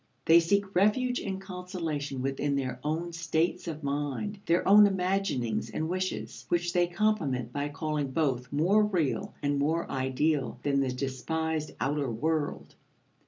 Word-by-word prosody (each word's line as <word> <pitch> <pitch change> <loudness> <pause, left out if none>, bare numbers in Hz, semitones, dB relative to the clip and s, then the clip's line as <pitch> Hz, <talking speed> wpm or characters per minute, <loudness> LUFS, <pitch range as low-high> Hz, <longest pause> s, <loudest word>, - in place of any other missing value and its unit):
They 165 +1 +8
seek 200 +3 +1
refuge 245 +7 +2
and 190 -1 -4
consolation 170 -8 -4
within 135 +1 0
their 130 -2 -2
own 165 +3 -2
states 170 +1 -1
of 155 -2 -5
mind, 145 +8 -2
their 170 +1 +2
own 205 +1 +8
imaginings 185 - -1
and 160 - -2
wishes, 185 +2 -3
which 175 0 0
they 175 -1 +3
compliment 165 - 0
by 145 0 -2
calling 150 -1 -2
both 130 -4 -1
more 180 +9 +3
real 190 0 -1
and 145 0 +1
more 160 +4 0
ideal 135 +2 0
than 140 -1 +2
the 135 -2 +1
despised 150 +5 -2
outer 140 -1 0
world. 150 +6 -2
160 Hz, 145 wpm, -29 LUFS, 140-180 Hz, -, They